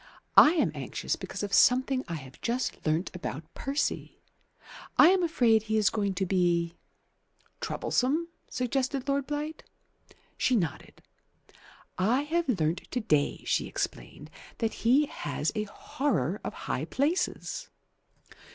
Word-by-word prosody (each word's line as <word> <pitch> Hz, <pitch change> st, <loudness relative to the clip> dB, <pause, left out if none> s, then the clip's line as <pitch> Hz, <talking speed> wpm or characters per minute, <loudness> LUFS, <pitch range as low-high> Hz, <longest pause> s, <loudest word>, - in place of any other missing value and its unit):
I 300 Hz, -, +9 dB
am 325 Hz, -, +2 dB
anxious -, -, -3 dB
because -, -, -6 dB
of 200 Hz, -1 st, -4 dB
something 255 Hz, +4 st, +4 dB
I 170 Hz, -, -3 dB
have 135 Hz, -4 st, -10 dB
just 245 Hz, +2 st, -2 dB
learnt 160 Hz, +4 st, +1 dB
about 160 Hz, -3 st, -6 dB
Percy. 275 Hz, +2 st, -2 dB, 0.8 s
I -, -, +9 dB
am 380 Hz, 0 st, +4 dB
afraid 240 Hz, -10 st, +3 dB
he 220 Hz, 0 st, -1 dB
is 210 Hz, -3 st, +3 dB
going 200 Hz, -3 st, -1 dB
to 190 Hz, -, 0 dB
be 175 Hz, -2 st, +1 dB, 0.4 s
" -, -, -39 dB
"Troublesome?" 300 Hz, +7 st, 0 dB, 0.2 s
suggested 260 Hz, +2 st, -1 dB
Lord 280 Hz, -1 st, 0 dB
Blight. 300 Hz, +1 st, -4 dB, 0.8 s
She 255 Hz, -, +3 dB
nodded. 170 Hz, -9 st, -3 dB, 1.0 s
"I 230 Hz, +9 st, +3 dB
have 335 Hz, +1 st, -1 dB
learnt 160 Hz, +3 st, -1 dB
to 250 Hz, -, -1 dB
day," 150 Hz, -11 st, +1 dB
she -, -, +1 dB
explained, -, -, -5 dB, 0.3 s
"that 225 Hz, -2 st, -1 dB
he 260 Hz, +6 st, +3 dB
has 150 Hz, -, -3 dB
a 215 Hz, 0 st, -2 dB
horror 205 Hz, -, -2 dB
of -, -, -4 dB
high -, -, -1 dB
places." 355 Hz, -, -1 dB
235 Hz, 135 wpm, -29 LUFS, 180-280 Hz, 1.0 s, I